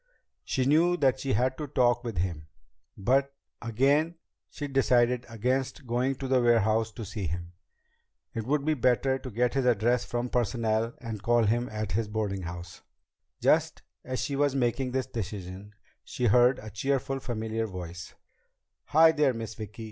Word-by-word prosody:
She 130 - -1
knew 165 +5 +4
that 135 -7 +2
she 135 - -1
had 130 +5 0
to 150 - -3
talk 120 -3 +2
with 115 -6 -5
him, 85 -3 -2 0.5
but 135 +7 +1 0.3
again 140 +8 +2 0.3
she 145 - -5
decided 125 -3 +2
against 130 +5 -2
going 125 +3 0
to 135 +1 -5
the 130 -1 +3
warehouse 115 -1 +3
to 110 - -7
see 100 -2 -4
him. 85 +2 -5 0.8
It 115 0 -4
would 145 0 +1
be 155 - +3
better 130 0 +2
to 130 - -7
get 120 +2 0
his 135 -2 0
address 120 +1 +2
from 120 0 -3
Personnel 115 -1 0
and 110 -4 -6
call 120 +1 +3
him 120 +3 +1
at 110 -2 -4
his 110 +2 0
boardinghouse. 95 -5 -4 0.6
Just - - +2 0.2
as 130 0 -4
she 140 - -2
was 140 -1 +1
making 130 0 0
this 130 0 -1
decision, 100 -4 -6 0.3
she 125 - -3
heard 125 +3 +5
a 110 0 -9
cheerful, 135 +5 -1
familiar 110 -2 -3
voice: 90 -2 -8 0.7
"Hi 160 +1 +6
there, 150 -5 +2
Miss 115 -2 -5
Vicki!" 105 0 -9
120 Hz, 165 wpm, -28 LUFS, 110-130 Hz, 0.8 s, Hi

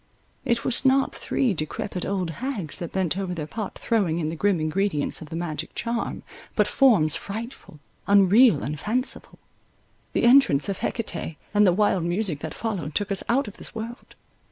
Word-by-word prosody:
It 235 -1 0
was 250 - +1
not 270 0 +3
three 250 -6 0
decrepid 175 +3 -4
old 185 -4 -1
hags 230 - -3
that 170 - -5
bent 190 -1 -1
over 185 -2 -3
their 155 -3 -4
pot 210 +5 -6
throwing 195 -8 0
in 155 -2 -1
the 165 - -4
grim 195 +1 +1
ingredients 155 0 0
of 155 - -9
the 165 - -6
magic 165 -2 -4
charm, 235 0 -3 0.3
but - - +4
forms 205 - +4
frightful, 220 - -7 0.3
unreal, 200 - +5
and 150 +1 -4
fanciful. 245 - -1 0.8
The - - +1
entrance 235 - +5
of 195 - -3
Hecate, 170 -8 -3 0.2
and 205 -1 +5
the - - +6
wild 190 -1 +2
music 175 -2 0
that 155 - -6
followed, 185 -10 -4
took 205 0 0
us 195 - 0
out 255 +1 +2
of 205 - -9
this - - -8
world. 230 +3 -7
195 Hz, 180 wpm, -25 LUFS, 165-230 Hz, 0.8 s, the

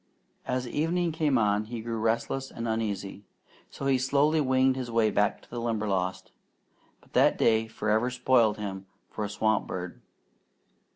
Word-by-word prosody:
As 125 -1 -1
evening 165 +5 0
came 155 -4 +1
on 105 -1 +2
he 115 +1 -6
grew 115 0 -4
restless 115 +4 -1
and 115 0 -5
uneasy, 105 -3 -3 0.5
so 135 - -7
he 135 -1 +3
slowly 145 +4 +2
winged 130 -1 +3
his 130 -2 -4
way 115 -2 +2
back 105 +1 +1
to - - -21
the 120 0 -4
Limberlost; 100 -5 -2 0.7
but - - -25
that - - +4
day 110 0 +3
forever 110 +2 0
spoiled 125 -4 +2
him 95 -2 -6 0.2
for 110 - -4
a 105 - -3
swamp 110 +1 0
bird. 90 -1 -6
115 Hz, 160 wpm, -28 LUFS, 105-130 Hz, 0.7 s, that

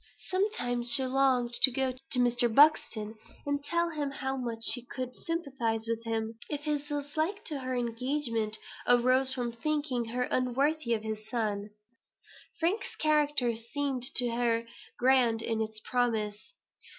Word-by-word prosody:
She - - -15
sometimes 245 - +3
longed 260 -2 +1
to - - +8
go 260 +1 -1
to 255 0 -1
Mr. 245 -1 +2
Buxton 220 -6 +3 0.3
and 285 0 -2
tell 340 +3 0
him 295 -3 -3
how 265 -1 -3
much 235 -3 -4
she 245 +1 +5
could 250 0 -6
sympathize 265 -9 -2
with 230 0 -2
him, 225 0 -3
if 295 -1 -3
his 295 -1 -2
dislike 310 +7 -3
to 295 -4 -2
her 255 -1 -3
engagement 235 -2 -1 0.3
arose 255 +2 +4
from 245 -2 -2
thinking 265 0 -2
her 245 +2 -2
unworthy 255 +1 0
of 215 - -6
his 215 0 -6
son. 210 -4 -2 0.9
Frank's 350 +6 -1
character 295 -6 +1
seemed 260 +3 -3
to 245 -1 +6
her 230 -1 0 0.3
grand 245 -3 +3
in 225 -1 -1
its 220 0 0
promise. 220 - -2
250 Hz, 145 wpm, -29 LUFS, 230-285 Hz, 0.9 s, to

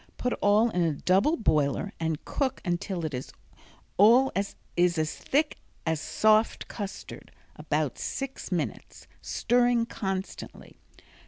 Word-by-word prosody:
Put 250 - -1
all 215 +3 +4
in 180 - 0
a 165 -2 +2
double 195 - +2
boiler 155 - +1
and 160 -2 -2
cook 270 -2 -1
until 175 0 -2
it 130 -5 -5 0.7
all 240 +7 +6
is 195 0 -2 0.4
as 155 -1 -1
thick 300 +3 0 0.3
as 160 -2 0
soft 215 +8 +2
custard 205 -3 -7 0.2
(about - - -2
six 270 -6 -5
minutes), 155 - -4 0.2
stirring 240 -1 +2
constantly. 190 -4 -6
200 Hz, 115 wpm, -28 LUFS, 160-240 Hz, 0.7 s, all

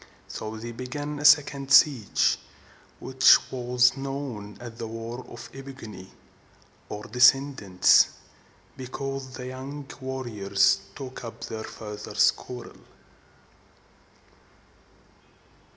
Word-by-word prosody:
So 110 0 -6
they 120 +2 -7
began 145 +5 -5
a 145 - -4
second 140 -2 +4
siege, 135 -5 +4 0.6
which 130 0 +6
was 125 0 +2
known 135 -7 -6
as 120 -1 -8
the 115 - -4
War 115 +2 -7
of 120 0 -10
the 135 - -10
E - - -6
pig´o 135 -4 -10
ni, 95 -3 -11 0.8
or 105 0 -6
descendants, 125 -5 +4 0.7
because 135 +1 -6
the 125 - -7
young 135 +3 -7 0.2
warriors 110 -7 +1 0.2
took 130 -2 -8
up 115 - -9
their 110 0 -5
fathers' 105 -1 0
quarrel. - - -10
125 Hz, 105 wpm, -26 LUFS, 110-135 Hz, 0.8 s, which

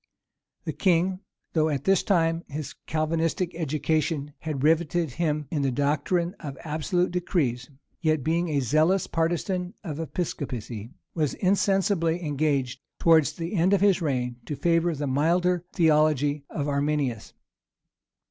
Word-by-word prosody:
The - - -3
king, 185 0 +2 0.3
though 160 -1 +2
at 145 -3 -2
this 195 -1 +3
time 165 -3 +1
his 150 0 -6
Calvinistic 165 +3 0
education 155 -1 -1
had 150 -4 -4
rivetted 165 0 +2
him 150 0 -1
in 150 - 0
the 135 - +1
doctrine 150 +6 0
of 140 -4 -7
absolute 165 +4 0
decrees, 155 -9 -1 0.3
yet, 155 -4 +1
being 170 +3 0
a 145 -2 +1
zealous 155 - +2
partisan 175 +2 -1
of 155 -5 -5
Episcopacy, 125 - -4 0.2
was 155 -4 0
insensibly 190 -3 +1
engaged, 140 -3 0 0.2
towards 160 -3 +4
the 165 +3 -5
end 185 +1 +3
of 195 - +3
his 195 -3 +4
reign, 125 -5 -1
to 150 - -3
favor 170 +1 +1
the 145 0 -3
milder 170 +6 +1
theology 150 -3 +2
of 145 -2 -3
Arminius. 140 -4 -1
160 Hz, 135 wpm, -26 LUFS, 145-175 Hz, 0.3 s, towards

